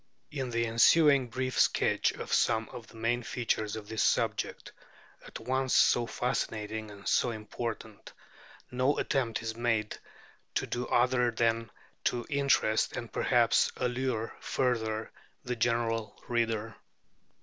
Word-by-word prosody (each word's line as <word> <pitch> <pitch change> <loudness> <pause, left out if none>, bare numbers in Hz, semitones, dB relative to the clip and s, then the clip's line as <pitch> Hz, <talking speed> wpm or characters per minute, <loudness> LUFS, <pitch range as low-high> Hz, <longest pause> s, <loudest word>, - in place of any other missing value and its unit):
In 135 -4 -3
the 115 0 0
ensuing 135 +4 +5
brief 130 +2 -2
sketch - - +3
of - - -6
some 115 -1 +2
of 120 -2 -10
the - - -17
main 115 +2 0
features 110 -3 -2
of 110 -2 -8
this 110 0 -2
subject, - - 0 0.6
at - - -8
once 130 0 0
so 120 -1 +4
fascinating 110 -4 -3
and 100 -1 -11
so 125 - +3
important, 110 -1 -6 0.6
no 130 +3 +1
attempt 120 -5 -1
is 110 -1 -4
made 115 -2 0 0.6
to - - +1
do 120 0 -3
other 125 0 +3
than 115 -1 0 0.4
to 120 -1 0
interest, 140 -6 +2
and 120 - -6
perhaps 120 -3 +3
allure 125 -2 -2
further, 110 -4 -1 0.3
the 125 0 -2
general 115 -1 -1
reader. 115 -2 -1
115 Hz, 130 wpm, -30 LUFS, 110-125 Hz, 0.6 s, ensuing